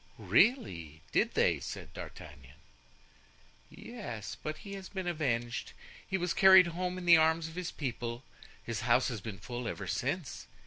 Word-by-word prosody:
"Really, 85 - +1
did - - +1
they?" - - +3
said - - -7
D'Artagnan. 70 -3 -10 1.1
"Yes, 195 - -7
but 155 0 -4
he 200 - -9
has 195 -1 -7
been 190 -2 -5
avenged. 125 -9 -2 0.3
He 190 - 0
was 180 -1 -1
carried 190 -1 +8
home 180 +1 -2
in 180 - -6
the 170 -1 +8
arms 160 +1 +3
of 160 - -10
the 180 0 -4
people. 120 -3 -4 0.4
His 115 -3 -4
house 120 +2 +3
has 115 -5 -5
been 105 -2 -6
full 120 +6 -6
ever - - -4
since. - - -3
155 Hz, 160 wpm, -32 LUFS, 115-180 Hz, 1.1 s, carried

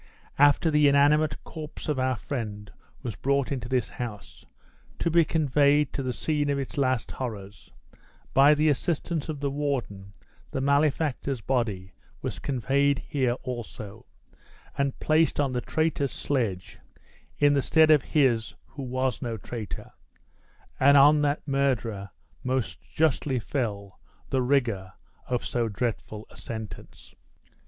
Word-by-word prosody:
After 145 +3 +5
the 150 -1 +5
inanimate 145 +2 +3
corpse 155 -2 -8
of 150 -4 0
our 130 0 +1
friend 110 -5 -5 0.3
was 115 -6 -4
brought 140 +4 0
into 125 -3 -3
this 125 -5 +1
house, 110 -4 -7 0.5
to 170 - 0
be 170 +1 +5
conveyed 150 -2 +2
to - - -2
the 130 -1 -2
scene 145 +2 -1
of 140 - +1
its 140 +3 -4
last 130 -4 0
horrors, 105 -5 -7 0.6
by 140 +2 +6
the 155 +1 +2
assistance 160 +2 -1
of 150 -3 -4
the 140 -1 -1
warden 130 -9 -3 0.4
the - - -3
malefactor's 140 -2 +1
body 105 -7 -2 0.3
was - - -4
conveyed 140 +2 +1
here 130 -4 +1
also, 115 -4 -7 0.7
and 140 -1 -1
placed 155 0 +2
on 140 -2 +1
the 125 -1 -1
traitor's 155 -3 0
sledge, 110 -10 -2 0.6
in 145 0 +4
the 140 - +2
stead 160 +3 +5
of 150 -3 +6
his 120 -9 +1
who 140 - -10
was 130 -1 -1
no 115 -3 -3
traitor, 110 0 -7 0.9
and 140 +2 +6
on 150 +2 +7
that 145 +1 0
murderer 125 -8 0 0.3
most 130 -2 -2
justly 150 -3 0
fell 105 - -3 0.3
the 130 - +2
rigor 120 -8 0 0.3
of 125 -1 -1
so 120 -2 -1
dreadful 110 0 -3
a - - -15
sentence." 110 -2 -8
135 Hz, 140 wpm, -27 LUFS, 115-145 Hz, 0.9 s, on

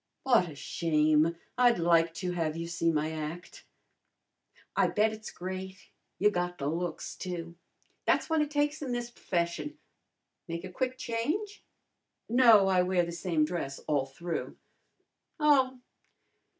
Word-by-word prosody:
"What 235 -10 +4
a 150 - -10
shame! 155 +1 +2 0.2
I'd 245 -1 +5
like 170 -1 +3
to 180 0 -2
have 165 -3 -1
you 165 - -3
see 165 0 0
my 155 0 0
act." 160 +2 -7 1.1
"I - - +4
bet 215 +1 +2
it's 220 0 -8
great. 190 +1 -7 0.3
You 210 +2 +4
got 180 -1 -2
the 140 - -4
looks, 170 +3 -3
too. 170 -2 -5 0.5
Tha's - - +3
what 320 -1 +2
it 300 - 0
takes 295 0 0
in 265 -4 -3
this 240 0 -3
p'fession. 175 - -2 0.7
Make 170 0 -4
a 185 - -7
quick 255 +5 -2
change?" 305 - -3 0.6
"No, 230 -5 +6
I 185 -1 +4
wear 180 -1 +2
the 170 - -5
same 170 -3 0
dress 150 -5 -4
all 140 -3 +1
through." 170 +5 -5 0.8
"Oh! 265 -4 +4
180 Hz, 145 wpm, -30 LUFS, 165-240 Hz, 1.1 s, No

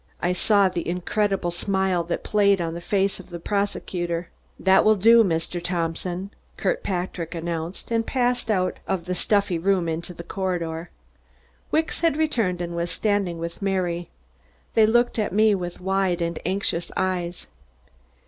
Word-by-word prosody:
I 180 - +1
saw 200 +1 +4
the 175 -2 -3
incredible 180 +1 0
smile 190 0 0
that 170 - -3
played 200 -2 +3
on 165 -1 -2
the 170 - -6
face 195 +2 0
of 190 - -12
the 175 - -6
prosecutor. 175 -3 -2 0.3
"That 190 0 +5
will 215 0 +5
do, 230 +3 +7
Mr. 170 -1 -1
Thompson," 175 +2 -2 0.3
Kirkpatrick 180 - -2
announced, 165 +4 -4
and 230 0 +2
I - - -20
passed 245 -2 +1
out 185 -4 +1
of 180 -3 -1
the 180 - -2
stuffy 200 -2 +1
room 185 -1 +2
into 165 +2 -4
the 170 - -8
corridor. 170 -3 -3 0.8
Wicks 320 +1 0
had 330 -3 +2
returned 225 - +1
and 170 0 -4
was 170 0 -1
standing 205 -5 0
with 170 +2 -6
Mary. 180 -3 -1 0.6
They 220 -1 +5
looked 240 +1 +2
at 210 - -1
me 215 +1 +5
with 175 -3 -4
wide 190 -1 +1
and 170 -1 -2
anxious 185 -2 -1
eyes. 180 -2 -1
185 Hz, 160 wpm, -24 LUFS, 170-200 Hz, 0.8 s, do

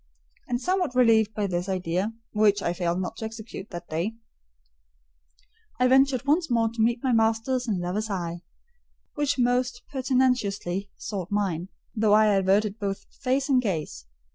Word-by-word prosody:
And 245 -1 -1
somewhat 360 -3 0
relieved 220 -4 +4
by 210 - 0
this 180 0 -2
idea 185 +2 -1 0.2
(which 210 -2 +3
I 170 - 0
failed 175 0 -1
not 185 +4 -4
to 220 - -4
execute 220 -2 -8
that 175 -1 -8
day), 170 +8 -2 1.6
I 250 - +4
ventured 265 -1 +3
once 320 +3 +2
more 230 -2 +2
to 230 0 -3
meet 235 +2 +1
my 260 - +2
master's 225 +3 +1
and 200 -5 0
lover's 195 +5 -2
eye, 175 -3 -3 0.7
which 290 -3 0
most 245 0 +1
pertinaciously 250 -8 0
sought 190 -4 -5
mine, 190 -5 -1 0.3
though 215 -1 +3
I 215 0 +5
averted 200 +2 +2
both 195 -1 -3 0.2
face 270 +1 +1
and 260 -3 +3
gaze. 155 - -3
220 Hz, 155 wpm, -26 LUFS, 190-250 Hz, 1.6 s, I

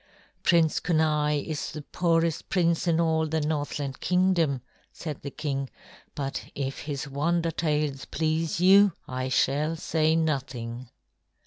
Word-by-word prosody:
"Prince 165 -3 +3
Kenai 150 -3 +1
is 155 -2 -4
the 150 - -6
poorest 165 0 0
prince 170 -2 +1
in 165 -1 +3
all 160 -1 +2
the 160 +1 0
Northland 145 -2 -2
Kingdom," 180 -7 +2 0.3
said 155 -5 -6
the 140 - -5
king; 135 -2 -3 0.5
"but 140 -1 -3
if 135 -1 -3
his 145 -1 -4
wonder 165 +4 0
tales 150 -4 -1
please 160 +1 -1
you, 195 +1 +6
I 130 0 -3
shall 145 +5 +1
say 160 0 +1
nothing." 130 -6 -2
155 Hz, 130 wpm, -27 LUFS, 140-165 Hz, 0.5 s, you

